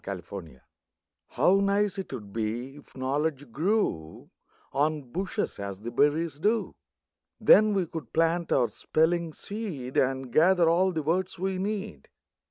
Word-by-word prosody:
EASY 95 Hz, -3 st, -5 dB
KNOWLEDGE 90 Hz, -6 st, -8 dB, 0.7 s
How 195 Hz, +2 st, +3 dB
nice 200 Hz, 0 st, +2 dB, 0.2 s
'twould 105 Hz, -7 st, -8 dB
be 115 Hz, +5 st, -3 dB
if 145 Hz, -, -16 dB
knowledge 140 Hz, 0 st, -2 dB
grew 155 Hz, -, -1 dB, 0.4 s
On 150 Hz, +1 st, +1 dB
bushes, 175 Hz, -, -3 dB
as 100 Hz, -1 st, -6 dB
the 120 Hz, +2 st, -5 dB
berries 150 Hz, +2 st, +1 dB
do! 220 Hz, +6 st, +1 dB, 0.7 s
Then 215 Hz, -1 st, +6 dB
we 190 Hz, -2 st, +1 dB
could 155 Hz, -7 st, -8 dB
plant 165 Hz, +1 st, +1 dB
our 120 Hz, -3 st, +3 dB
spelling 165 Hz, +8 st, 0 dB
seed, 165 Hz, -, -6 dB
And 130 Hz, -2 st, 0 dB
gather 175 Hz, +2 st, +5 dB
all 180 Hz, +3 st, +3 dB
the 160 Hz, -3 st, -2 dB
words 180 Hz, +5 st, -1 dB
we 190 Hz, +1 st, -2 dB
need. 205 Hz, +1 st, -4 dB
155 Hz, 140 wpm, -27 LUFS, 130-185 Hz, 0.7 s, Then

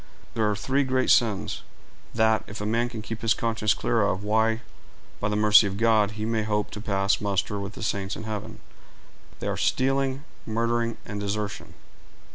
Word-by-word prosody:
There 110 Hz, -2 st, +1 dB
are 105 Hz, -, 0 dB
three 135 Hz, +7 st, +1 dB
great 130 Hz, -1 st, +1 dB
sins, 110 Hz, -5 st, +2 dB, 0.5 s
that, 110 Hz, -1 st, +3 dB
if 105 Hz, -, -8 dB
a 105 Hz, -, -3 dB
man 115 Hz, +3 st, +1 dB
can 110 Hz, -3 st, -7 dB
keep 115 Hz, 0 st, -6 dB
his 115 Hz, -1 st, +3 dB
conscience 110 Hz, -2 st, +1 dB
clear 120 Hz, -1 st, +1 dB
of, 100 Hz, -1 st, 0 dB
why, 110 Hz, +2 st, +2 dB, 0.6 s
by 105 Hz, -, -1 dB
the 105 Hz, -, -1 dB
mercy 105 Hz, 0 st, +6 dB
of 100 Hz, 0 st, -4 dB
God, 110 Hz, -2 st, +3 dB
he 110 Hz, -, -2 dB
may 115 Hz, -1 st, 0 dB
hope 105 Hz, -1 st, -1 dB
to 105 Hz, -, -7 dB
pass 100 Hz, -2 st, +1 dB
muster 100 Hz, 0 st, -1 dB
with 100 Hz, +1 st, -5 dB
the -, -, -8 dB
saints 100 Hz, -1 st, -2 dB
in -, -, -7 dB
heaven: 110 Hz, +1 st, -6 dB, 0.8 s
they -, -, -3 dB
are -, -, -1 dB
stealing, 135 Hz, +1 st, +1 dB, 0.2 s
murdering, 115 Hz, +1 st, -1 dB
and 105 Hz, -1 st, -5 dB
desertion." 100 Hz, -1 st, -4 dB
110 Hz, 185 wpm, -26 LUFS, 105-115 Hz, 0.8 s, mercy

